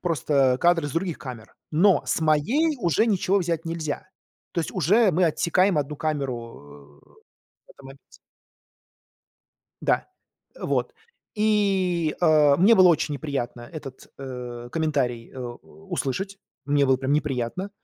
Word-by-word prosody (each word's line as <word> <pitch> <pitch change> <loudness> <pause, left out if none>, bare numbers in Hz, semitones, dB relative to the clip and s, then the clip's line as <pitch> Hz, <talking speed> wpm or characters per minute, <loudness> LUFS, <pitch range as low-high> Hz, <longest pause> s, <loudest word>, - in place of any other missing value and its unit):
просто 140 -6 +1
кадры 170 -3 +3
с - - -8
других 170 -1 -2
камер. 120 -5 -9 0.2
Но 180 +5 +4
с - - 0
моей 230 - +2
уже 175 - +2
ничего 200 -1 +2
взять 170 -2 -2
нельзя. 165 -1 -4 0.4
То 170 - -1
есть - - -4
уже 195 +4 +3
мы 180 +3 +3
отсекаем 170 +2 +2
1 145 +1 -3
камеру, 115 - -5
э, - - -23 0.7
в - - -20
этом 140 - -15
моменте. 135 +1 -16 1.6
Да, - - +1 0.5
э, - - -13
вот. - - -1 0.4
И, 195 -6 +1
э, 150 -4 +5
мне 205 +6 +6
было 185 -3 +7
очень 155 -2 +1
неприятно 135 -5 -4
этот, 140 -5 -9
э, 125 -3 -7
комментарий, 140 -8 -1
э, 130 - -10
у 125 +11 -10
услышать. 190 +7 -3 0.3
Мне 145 0 +2
было 130 0 +4
прям 135 +1 -2
неприятно. 150 +6 -2
155 Hz, 140 wpm, -24 LUFS, 135-180 Hz, 1.6 s, было